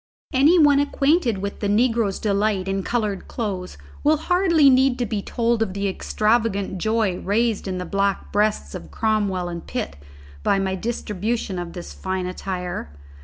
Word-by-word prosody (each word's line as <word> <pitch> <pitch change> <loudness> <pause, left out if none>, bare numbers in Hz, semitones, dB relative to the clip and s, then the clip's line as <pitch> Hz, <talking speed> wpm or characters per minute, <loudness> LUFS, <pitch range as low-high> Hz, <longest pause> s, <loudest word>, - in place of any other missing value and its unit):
Any 290 +7 +5
one 290 -3 +6
acquainted 285 - +2
with 200 - -4
the 205 - -1
negro's 225 -1 +2
delight 200 -2 0
in 195 0 -1
coloured 210 -2 -2
clothes 190 - -4 0.3
will 305 +1 +4
hardly 335 -2 +3
need 260 -1 +4
to 245 - 0
be 210 -2 -2
told 235 +2 0
of 195 -4 -1
the 200 0 -1
extravagant 210 -1 0
joy 215 -3 0
raised 220 +1 0
in 185 -1 -2
the 180 - -4
black 195 +2 -1
breasts 205 - 0
of 80 - -8
Cromwell 205 -5 0
and 170 -1 -6
Pitt 70 - -4 0.4
by 195 - +2
my 190 -1 0
distribution 210 -1 -3
of 175 -1 -6
this 175 -2 -8
fine 185 -1 -3
attire. 180 - -4
205 Hz, 165 wpm, -23 LUFS, 190-235 Hz, 0.4 s, one